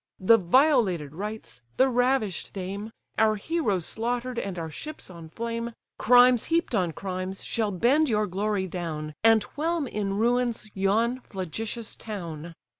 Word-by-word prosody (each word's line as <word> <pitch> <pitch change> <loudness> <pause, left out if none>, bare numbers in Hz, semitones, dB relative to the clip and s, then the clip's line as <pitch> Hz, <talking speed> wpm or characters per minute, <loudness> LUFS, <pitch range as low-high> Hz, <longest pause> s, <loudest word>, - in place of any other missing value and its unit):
The 225 +5 +6
violated 195 - +3
rites, 210 - -6 0.2
the 260 - +5
ravish'd 245 -6 0
dame; 200 +3 -5 0.3
Our 220 -1 +4
heroes 210 - -1
slaughter'd 245 +2 -2
and 195 -2 -4
our 165 -2 -4
ships 300 - -8
on 165 -2 -10
flame, 230 +4 -4 0.3
Crimes 245 0 +6
heap'd 335 -3 0
on 180 -6 +1
crimes, 185 +2 -5
shall 220 -2 -1
bend 260 - +3
your 210 -2 +2
glory 200 +1 -1
down, 160 -4 -4
And 225 -1 +6
whelm 325 +1 0
in 205 -5 -2
ruins 235 -1 0
yon 220 +6 +1
flagitious 215 +3 -5
town. 170 -6 -7
215 Hz, 140 wpm, -27 LUFS, 185-245 Hz, 0.3 s, The